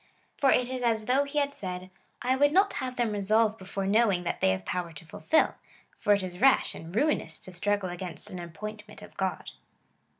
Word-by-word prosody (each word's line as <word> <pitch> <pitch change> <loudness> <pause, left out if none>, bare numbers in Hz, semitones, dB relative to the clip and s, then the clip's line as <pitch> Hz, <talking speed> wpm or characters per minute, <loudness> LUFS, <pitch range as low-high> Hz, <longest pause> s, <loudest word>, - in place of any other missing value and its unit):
For 275 - +3
it 250 0 +3
is 255 -1 -3
as 225 -3 +1
though 265 +4 +3
he 285 +1 -6
had 285 -1 +1
said 185 -4 -5
— - - -38
" - - -43
I 255 +1 +2
would 290 +2 +4
not 390 +4 +4
have 255 -1 -4
them 240 -3 0
resolve 215 +2 +2
before 195 +1 -4
knowing 200 -3 +3
that 175 - -3
they - - +4
have 95 0 -1
power 180 -2 -3
to 160 +1 -11
fulfil, 315 - +1 0.5
for 210 - +1
it 200 -1 +1
is 180 0 -7
rash 270 0 +4
and 165 +1 -9
ruinous^ 220 - 0
to 185 - -7
struggle 200 +1 0
against 180 +2 -5
an 180 - -6
appointment 210 +5 -8
of - - -13
God." 190 -1 -3
210 Hz, 220 wpm, -28 LUFS, 180-250 Hz, 0.5 s, would